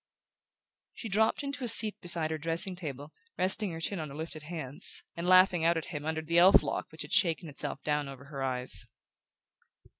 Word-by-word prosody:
She 225 - -7
dropped 220 +7 +1
into 280 -1 -5
a - - -1
seat 215 -2 +6
beside 170 -3 0
her 160 - -3
dressing 165 +4 -1
table, 145 -4 -7 0.2
resting 190 +2 +1
her 165 -1 -6
chin 185 +3 -3
on 155 -2 -5
her 140 - -10
lifted 160 0 -7
hands, 150 -4 -2
and 170 +1 -4
laughing 185 -2 +5
out 165 0 +3
at 165 +2 -6
him 145 -1 -5
under 160 0 -2
the 170 +2 +2
elf 185 +3 +7
lock - - -4
which - - -8
had - - -9
shaken 170 -1 +2
itself 145 -1 -5
down 150 -1 -1
over 135 0 -11
her 140 -1 -8
eyes. 125 -5 0
165 Hz, 200 wpm, -30 LUFS, 150-185 Hz, 0.2 s, elf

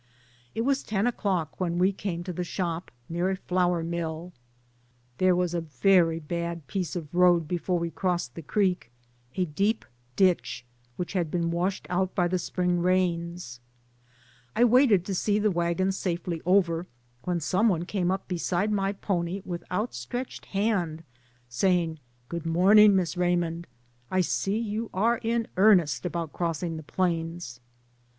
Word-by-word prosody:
It 225 - 0
was 275 +3 +1
ten 210 0 -1
o'clock 190 -9 -1
when 175 -2 -1
we 185 +2 +4
came 180 -3 -4
to 180 0 -5
the 180 - -2
shop, 175 -1 -3 0.2
near 175 +3 -1
a 190 - 0
flour 180 -2 0
mill. 170 +1 -4 0.9
There 185 -1 +4
was 180 -1 0
a 170 - 0
very 165 +3 +3
bad 170 0 -4
piece 175 +4 -3
of 160 -3 -6
road 175 -2 +4
before 180 +1 -1
we 170 0 -2
crossed 175 -7 -1
the 165 - -7
creek, 185 - 0 0.5
a 185 - +1
deep 200 +8 0 0.3
ditch 180 -9 +1 0.4
had 175 -5 -1
been 170 0 -1
washed 180 +3 -1
out 185 +1 0
by 175 -2 +2
the 180 +1 0
Spring 180 0 0
rains. 170 -6 0 1.0
I 235 - +4
waited 240 -6 +5
to 195 - -3
see 205 +3 +1
the 210 0 +2
wagons 175 +2 0
safely 170 -2 -2
over, 180 -2 +3 0.4
when 180 -1 0
some 190 +8 +2
one 175 -3 0
came 185 -2 0 0.2
beside 180 +3 0
my 195 -1 0
pony 185 -1 -2
with 175 -2 -5
outstretched 245 +5 -4
hand 195 -6 -1 0.4
saying, 165 +4 +1 0.3
"Good 170 +1 -5
morn 185 +6 +5
ing, 210 -1 +8
Miss 185 -2 0
Raymond, 175 -1 0 0.4
I 185 - +2
see 195 +3 0
you 225 0 -3
are 230 +5 +2
in 230 0 -1
earnest 185 -5 +4
about 170 -3 -4
crossing 165 -1 -2
the - - -6
plains." 165 -5 -2
180 Hz, 155 wpm, -27 LUFS, 170-195 Hz, 1.0 s, ing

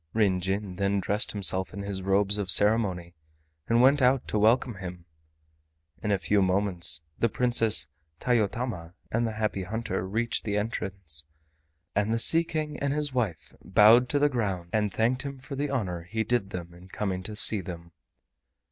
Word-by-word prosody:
Ryn 100 -5 +2
Jin 95 0 -3
then 100 0 0
dressed 105 +2 +1
himself 95 -2 0
in 100 - -5
his 100 -1 -4
robes 100 +2 +2
of 100 -3 -3
ceremony, 95 -4 +4 0.5
and 115 +1 +3
went 140 +2 +4
out 130 0 +2
to 105 - 0
welcome 115 +1 +2
him. 90 -2 -8 1.0
In 105 - -3
a 100 - +2
few 100 +2 +1
moments 90 -4 +1 0.2
the 115 - +2
Princess 115 -9 +3 0.3
Tayotama 110 -6 -2 0.2
and 115 +1 0
the 110 - -4
Happy 110 -2 -2
Hunter 95 -1 -4
reached 115 +4 -1
the 105 -1 -2
entrance, 95 -7 -3 0.7
and 105 +2 +1
the 115 - +1
Sea 165 +8 +4
King 155 -2 -4
and 140 0 -1
his 145 -2 -2
wife 110 -10 -3
bowed 110 +6 +5
to 145 - +1
the 145 +1 +3
ground 100 -10 -3
and 105 -2 0
thanked 120 +6 0
him 140 -1 -6
for 135 +2 -9
the 145 +1 -2
honor 95 -11 -3
he 110 +6 -3
did 110 -3 -1
them 85 -3 -7
in 90 +1 -15
coming 95 -1 -3
to 105 +3 -8
see 105 -1 +4
them. 85 -2 -9
105 Hz, 175 wpm, -27 LUFS, 95-115 Hz, 1.0 s, bowed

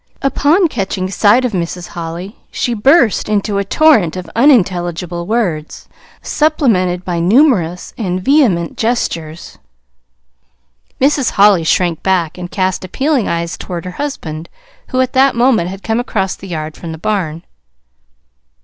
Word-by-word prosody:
Upon 295 +7 +3
catching 190 - -3
sight 215 +6 +3
of 250 - -1
Mrs. 175 -1 -4
Holly 170 +4 -7
she 240 - -2
burst 240 - +3
into 205 -1 0
a - - 0
torrent 215 - +3
of 180 - -7
unintelligible 175 - +1
words, 185 -9 -2 0.4
supplemented 210 - +1
by 175 -2 -2
numerous 180 - +2
and 185 -4 -2
vehement 195 - +2
gestures. 170 -9 -3 1.4
Mrs. 275 -1 +2
Holly 200 -4 +5
shrank 170 0 +1
back, 180 -3 0
and 175 0 -6
cast 185 -1 -1
appealing 265 - 0
eyes 170 0 -3
toward 175 -1 -6
her 180 - -5
husband 165 - -5 0.4
who 255 - -2
at 255 +1 -1
that 265 -1 +3
moment 235 -8 +2
had 195 +1 -9
come 225 +1 0
across 195 -6 -2
the 195 - -11
yard 155 -3 -5
from 165 -2 -7
the - - -8
barn. 165 -3 -2
190 Hz, 140 wpm, -15 LUFS, 175-245 Hz, 1.4 s, Holly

